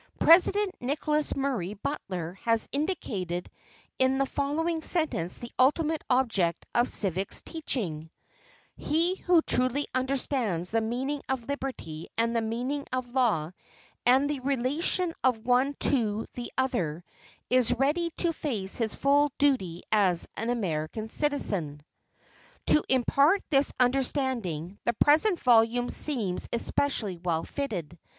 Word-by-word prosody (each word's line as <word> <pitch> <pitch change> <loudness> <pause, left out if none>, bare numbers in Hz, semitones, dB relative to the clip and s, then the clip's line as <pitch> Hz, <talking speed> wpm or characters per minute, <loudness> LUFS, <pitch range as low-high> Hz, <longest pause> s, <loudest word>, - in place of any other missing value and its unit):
President 375 +4 +5
Nicholas 300 +3 0
Murray 250 -9 -2
Butler 185 - -4
has 230 -1 +2
indicated 210 - -3 0.5
in 260 0 +3
the 275 - +2
following 315 +5 -1
sentence 305 - -1
the 240 - -8
ultimate 305 +4 +2
object 225 -10 +1
of 240 +1 +2
civics 190 -1 -2
teaching: 185 - -3 0.7
"He 340 +4 0
who 350 -4 +3
truly 255 +3 +1
understands 255 - -1
the 225 0 +2
meaning 260 +6 -2
of 255 -3 -2
liberty 255 - -5
and 230 +1 +1
the 230 - +2
meaning 245 +6 -3
of 255 -1 -2
law, 210 - +1 0.5
and 260 +4 +4
the 290 -2 -2
relation 280 +7 0
of 235 -4 +1
one 255 +3 +2
to 225 -5 +2
the 240 -1 -6
other, 180 - -1 0.5
is 255 -2 +4
ready 295 +7 +1
to 340 -2 +1
face 215 -12 -3
his 225 -3 -1
full 285 +1 +3
duty 190 -12 +1
as 190 -5 +2
an 225 +2 -3
American 205 -1 -2
citizen." 195 - -1 0.8
To 300 - +4
impart 280 +8 +3
this 275 -1 +3
understanding, 245 - 0
the 235 - +1
present 315 - +3
volume 240 0 +3
seems 225 -12 -1
especially 230 -5 0
well 170 -1 -1
fitted. 180 - -5
250 Hz, 125 wpm, -28 LUFS, 205-285 Hz, 0.8 s, President